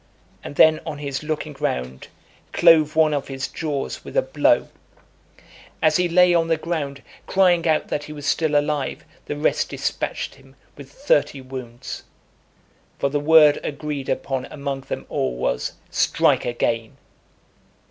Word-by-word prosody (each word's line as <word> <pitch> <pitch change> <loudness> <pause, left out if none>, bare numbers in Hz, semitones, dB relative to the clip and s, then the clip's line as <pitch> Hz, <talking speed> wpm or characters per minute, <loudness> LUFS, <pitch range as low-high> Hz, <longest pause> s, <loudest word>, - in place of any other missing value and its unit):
and - - -8
then, 155 +1 +6
on 155 -3 -5
his 140 -2 -4
looking 155 -1 -4
round, 65 +1 -3 0.5
clove 160 -3 +5
one 155 -1 +4
of 140 -1 -2
his 135 -1 -4
jaws 145 -4 -4
with - - -6
a - - +4
blow. - - +2 1.1
As 155 -1 +3
he 180 -1 +1
lay 180 +1 +5
on 165 -1 +2
the 165 -1 +2
ground, 150 -4 -4 0.2
crying 180 -3 +3
out 155 -1 +1
that 150 - -2
he - - -10
was 145 -1 -8
still 155 0 +1
alive, 145 -1 -1 0.2
the - - -3
rest 150 - +1
dispatched - - -3
him 135 0 -20 0.2
with 140 -1 -12
thirty 145 - +1
wounds. 130 -2 -8 1.0
For 140 - 0
the 145 +1 0
word 150 0 +6
agreed 145 -2 -4
upon 130 -2 -2
among 140 -2 -5
them - - -6
all 65 -2 -2
was, 60 0 -2 0.2
"Strike - - +2
again." 115 -2 -2
145 Hz, 150 wpm, -22 LUFS, 135-160 Hz, 1.1 s, then